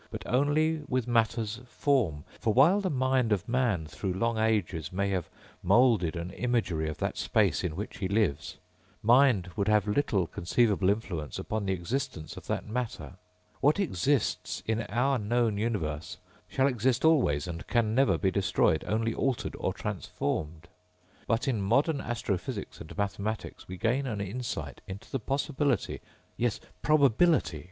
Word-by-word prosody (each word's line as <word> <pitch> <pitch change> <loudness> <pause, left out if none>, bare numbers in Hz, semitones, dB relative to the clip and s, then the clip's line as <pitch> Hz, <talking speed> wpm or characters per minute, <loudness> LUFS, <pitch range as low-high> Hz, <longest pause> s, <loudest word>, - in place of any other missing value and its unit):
but - - -7
only 150 +4 +2
with 130 -2 -1
matter's 115 -1 +1
form. 120 - 0 0.2
For 110 - 0
while 170 +11 +6
the 190 - -1
mind 130 -4 +1
of 100 -4 0
man 115 -9 +1
through 95 +4 -4
long 115 +3 0
ages 100 -8 0
may 100 +2 0
have 90 -4 -2 0.3
moulded 115 -10 +4
an 85 +2 -4
imagery 105 -11 -1
of 75 - -5
that - - -2
space - - +2
in 85 -4 -2
which 105 +4 -6
he 95 - -1
lives, 95 -8 0 0.5
mind 115 -6 +4
would 100 -2 -1
have 105 0 +3
little 105 -5 +1
conceivable 95 +4 +1
influence 90 - -2
upon 105 -2 -3
the 95 - +2
existence 95 - -4
of - - -11
that - - -2
matter. 115 -3 -4 0.5
What 150 +7 +3
exists 140 - 0
in 110 0 0
our 125 +5 +1
known 110 0 +1
universe 80 -9 -2 0.3
shall 135 - +1
exist 130 +1 +1
always 125 - +3
and 85 -1 -6
can 115 -3 +1
never 135 +3 +3
be 95 -3 +1
destroyed, 95 -5 +2
only 115 +1 0
altered 130 0 -1
or - - 0
transformed._ 80 +1 -3 0.7
_But 115 +4 +1
in 120 -6 0
modern 140 - +2
astrophysics 110 -1 -4
and 80 - -10
mathematics 100 +1 -3
we 95 - -7
gain 125 +7 0
an 110 -4 -3
insight 105 +5 -4
into 95 +1 -9
the 135 - -1
possibility... 135 - -1 0.4
yes 120 -2 0 0.2
probability 145 - +3
110 Hz, 155 wpm, -29 LUFS, 95-130 Hz, 0.7 s, while